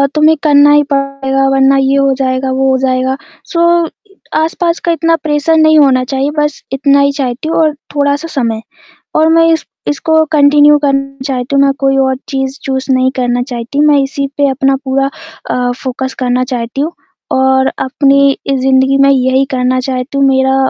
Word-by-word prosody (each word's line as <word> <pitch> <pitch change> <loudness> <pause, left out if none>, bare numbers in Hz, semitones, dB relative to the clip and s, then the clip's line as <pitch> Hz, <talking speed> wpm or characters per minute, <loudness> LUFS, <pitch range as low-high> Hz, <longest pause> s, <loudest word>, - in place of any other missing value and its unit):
तुम्हें 310 +1 +4
करना 290 -1 +5
ही 295 - +4
पड़ेगा 275 -1 -1
वरना 270 0 +3
ये 270 0 +1
हो 275 -1 +2
जाएगा, 260 0 -2
वो 265 +1 0
हो 260 - +2
जाएगा। 260 0 -1 0.4
सो 340 0 +2 0.5
आसपास 335 +2 -1
का 340 - +2
इतना 330 0 +1
प्रेशर 300 +1 +1
नहीं 315 0 +4
होना 260 -3 +3
चाहिए। 270 +2 -2
बस 295 -1 -1
इतना 280 +1 +2
ही 280 0 +2
चाहती 270 +1 -4
हूँ - - -1
और 310 -2 +2 0.2
थोड़ा-सा 285 +3 0
समय 230 -8 -2 0.6
और 315 +1 +3
मैं 330 0 +4
इस 320 - -1 0.2
इसको 315 +2 +1
कंटिन्यू 295 0 +5
करना 275 -1 -1
चाहती 260 0 -2
हूँ। 275 - +4
मैं 275 - +2
कोई 270 0 +1
और 265 -1 +1
चीज़ 270 0 -3
चूज़ 265 0 -3
नहीं 255 0 +2
करना 245 -1 -1
चाहती। 245 +2 -4
मैं 295 -1 +4
इसी 275 +1 -3
पे 285 -1 +2
अपना 270 0 +1
पूरा 270 +1 0 0.4
अ, 245 0 -1
फोकस 260 0 -4
करना 250 0 0
चाहती 245 0 -4
हूँ 310 +4 -2 0.4
और 265 0 +2
अपनी 275 +1 +2 0.2
इ 275 - +1
ज़िंदगी 265 +1 +2
में 275 0 +4
यही 260 0 +2
करना 255 0 0
चाहती 255 +1 -4
हूँ। 275 - +3
मेरा 265 0 +2
275 Hz, 185 wpm, -12 LUFS, 260-290 Hz, 0.6 s, करना